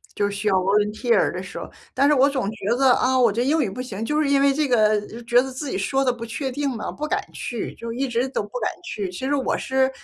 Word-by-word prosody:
就 205 0 +1
需 205 +1 -1
要 - - +2
volunteer 210 +4 +2
的 180 - -5
时 190 - -9
候， - - -6 0.2
但 275 - +2
是 - - +5
我 275 -1 +5
总 260 -7 -1
觉 215 -3 -9
得， 265 -1 +5
啊， 260 +1 +2
我 240 -4 +4
这 235 +4 0
英 310 +4 +2
语 220 - -1
不 205 +7 -6
行， 225 -4 -5
就 300 +6 0
是 290 - +1
因 280 -1 +3
为 280 0 +4
这 300 +1 0
个 215 -4 +3 0.2
觉 240 +1 +4
得 265 - -4
自 265 +2 -5
己 - - -2
说 270 +8 0
得 255 - +3
不 235 -1 -7
确 265 +4 -4
定 285 +2 -1
了， 215 - -4
不 300 - -4
敢 - - 0
去， 240 -3 -5
就 230 0 -6
一 265 +3 -1
直 245 0 0
都 265 - -2
不 205 - -10
敢 215 - 0
去。 200 -3 -4
其 180 - -8
实 280 - 0
我 275 -2 0
是， 265 0 +1
245 Hz, 345 characters per minute, -23 LUFS, 210-270 Hz, 0.2 s, 是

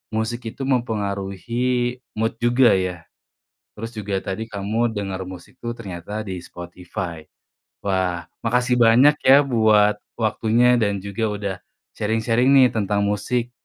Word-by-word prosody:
musik 115 +1 -2
itu 135 - -5
mempengaruhi 120 +1 -1 0.2
mood 115 +1 -2
juga 120 +1 +4
ya. 90 -3 -1 0.7
Terus 115 +2 -8
juga 100 -2 -2
tadi 110 +5 -5
kamu 110 +4 -1
denger 95 -3 -4
musik 90 +5 -11
tuh 120 - -2
ternyata 105 +1 -6
di 95 - -4
Spotify. 85 -2 -7 0.6
Wah 90 -3 0 0.2
makasih 125 +1 +1
banyak 120 +6 +6 0.2
ya 140 +1 +7
buat 110 -4 +3 0.2
waktunya 115 +2 +2
dan 100 -2 +1
juga 100 +3 -5
udah 100 -2 -3 0.4
sharing-sharing 115 +4 +1
nih 130 -2 +5
tentang 100 -1 0
musik. 115 +4 -1
110 Hz, 130 wpm, -22 LUFS, 100-120 Hz, 0.7 s, ya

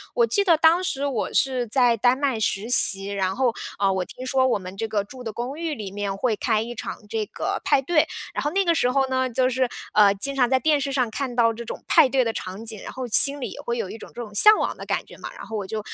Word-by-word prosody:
我 480 -1 +4
记 405 - +3
得 340 -5 +4
当 325 +3 +4
时 280 -6 -2
我 260 -6 -2
是 255 -2 +2
在 240 0 +3
丹 245 +4 +3
麦 270 -5 -1
实 210 +1 -1
习， 195 -5 +4
然 195 -2 -2
后， 255 -3 +1 0.3
呃， 195 -1 +2
我 190 -1 -1
听 255 - -10
说 260 0 +2
我 240 -5 +1
们 185 0 -9
这 225 - -2
个 210 -2 -1
住 250 +4 -12
的 220 - -4
公 245 +6 -5
寓 330 -2 -2
里 205 -6 -7
面 200 -1 -3
会 220 +2 0
开 215 +1 0
一 240 +2 -6
场 - - -6
这 220 -1 -2
个， - - -4
派 270 - +3
对。 305 +2 +2 0.3
然 - - -3
后 295 - -1
那 390 +3 +1
个 340 -1 +2
时 250 -5 +1
候 270 0 +1
呢， 260 0 0
就 255 +1 +1
是， 255 0 0 0.3
呃， 205 -2 +5
经 275 +8 -3
常 250 -2 +2
在 260 -1 +3
电 305 0 +2
视 275 - -2
上 250 -4 0
看 250 +1 -4
到 230 -2 +3
这 235 +1 -8
种 - - -8
派 260 - +5
对 260 -1 +2
的 225 - -2
场 190 +3 -6
景， 220 -2 -7
然 - - -7
后 255 -1 -6
心 280 +5 +5
里 - - -4
也 - - -10
会 235 0 -3
有 215 -5 -3
一 - - -8
种 - - -12
这 240 - -7
种 215 -3 -9
向 425 - +7
往 - - -2
的 - - -8
感 - - -2
觉 - - -15
嘛。 - - -8
然 - - -10
后 225 - -7
我 205 - -4
就 215 +3 -4
245 Hz, 310 characters per minute, -23 LUFS, 215-270 Hz, 0.3 s, 向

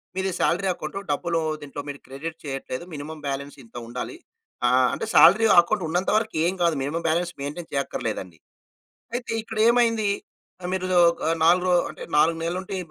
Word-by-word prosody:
"మీది 190 0 -1
salary 175 +5 +1
account. 155 +1 -7
డబ్బులు 165 +3 0 0.2
దీంట్లో 145 0 -7
మీరు 140 - -6
క్రెడిట్ 155 +5 -6
చేయట్లేదు, 135 0 -5
మినిమమ్ 150 +1 -7
బ్యాలెన్స్ 140 +1 -4
ఇంత 115 - -24
ఉండాలి". 125 - -6 0.5
ఆహ్, 125 +1 +4
అంటే - - -3
సాలరీ 215 +6 +7
అకౌంట్ 185 +3 +2
ఉన్నంతవరకు 210 +6 0
ఏమి 185 +2 0
కాదు. 170 -2 +3
Minimum 165 +5 -3
balance 175 +2 0
maintain 150 +4 -6
చేయక్కర్లేదండి. 110 - -3 0.8
అయితే 245 -1 -3
ఇక్కడేమైంది? 225 0 +2 0.6
మీరు 185 0 -1 0.3
ఒక 170 - -9 0.2
4 180 +2 +4
రో - - +3 0.2
అంటే - - -9
4 165 +2 +4
నెలలు 170 +2 -1
ఉంటే, 195 - -6
170 Hz, 155 wpm, -24 LUFS, 145-190 Hz, 0.8 s, సాలరీ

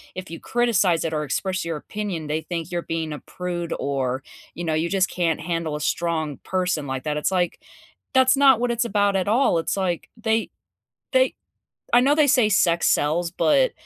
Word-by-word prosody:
if 185 0 -7
you 165 - -7
criticize 205 -9 +1
it 160 - -2
or 150 0 -1
express 190 +5 -2
your 165 -2 -3
opinion, 185 -4 -5
they 155 +2 -1
think 170 -1 -5
you're 175 0 -1
being 160 -2 -3
a - - -6
prude 175 -2 -5
or, 135 -2 -1 0.3
you 175 - -5
know, 160 -2 -1
you 160 +2 0
just 190 -1 +1
can't 170 -3 0
handle 165 -2 -2
a 150 - -5
strong 160 -3 -1
person 180 -5 -1
like 130 -1 -4
that. 150 -1 -2
It's 150 - 0
like, 180 -2 0 0.5
that's 260 0 +5
not 270 -4 +6
what 245 0 0
it's 235 0 0
about 205 -2 +1
at 190 0 0
all, 230 -4 +3
it's, 165 - -2
like, 180 -3 -2
they 225 0 0 0.6
they - - +3 0.6
I 240 - +7
know 275 +3 +4
they 300 -1 +4
say 255 -5 +4
"sex 170 -4 +3
sells" 165 +3 +1
but - - +2
175 Hz, 200 wpm, -23 LUFS, 160-210 Hz, 0.6 s, I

